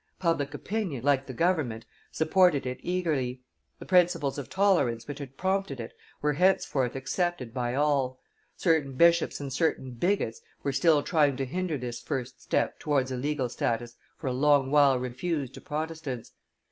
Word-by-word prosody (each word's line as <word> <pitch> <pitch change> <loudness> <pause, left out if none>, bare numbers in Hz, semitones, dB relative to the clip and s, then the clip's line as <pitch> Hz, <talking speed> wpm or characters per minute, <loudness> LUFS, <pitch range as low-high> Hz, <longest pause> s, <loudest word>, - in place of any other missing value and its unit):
Public 165 -6 0
opinion, 185 - -3
like 140 -1 +2
the - - -5
government, 130 -8 0 0.3
supported 160 -2 +3
it 125 0 -4
eagerly; 150 -9 -1 0.3
the - - -10
principles 175 -7 +2
of 140 - -7
tolerance 165 - +2
which 145 0 -6
had 135 -2 -9
prompted 190 -7 -1
it 115 0 -6 0.3
were 150 0 +2
henceforth 150 -7 +2
accepted 135 -2 -2
by 125 -1 -1
all; 140 -3 +1 0.4
certain 160 -6 +2
bishops 170 +4 +4
and 140 -2 -5
certain 140 -4 0
bigots 125 - -1 0.2
were 140 - -1
still 155 0 +4
trying 145 -5 +2
to 135 - -1
hinder 175 +3 -2
this 120 -2 -5
first 130 -1 -4
step - - -1
towards 135 -3 0
a - - -1
legal 135 0 -1
status 120 0 -2 0.2
for - - -10
a 130 - 0
long 140 0 +3
while 140 -3 +5
refused 130 +3 -3
to - - -10
Protestants. 155 -5 -5
145 Hz, 160 wpm, -28 LUFS, 130-165 Hz, 0.4 s, while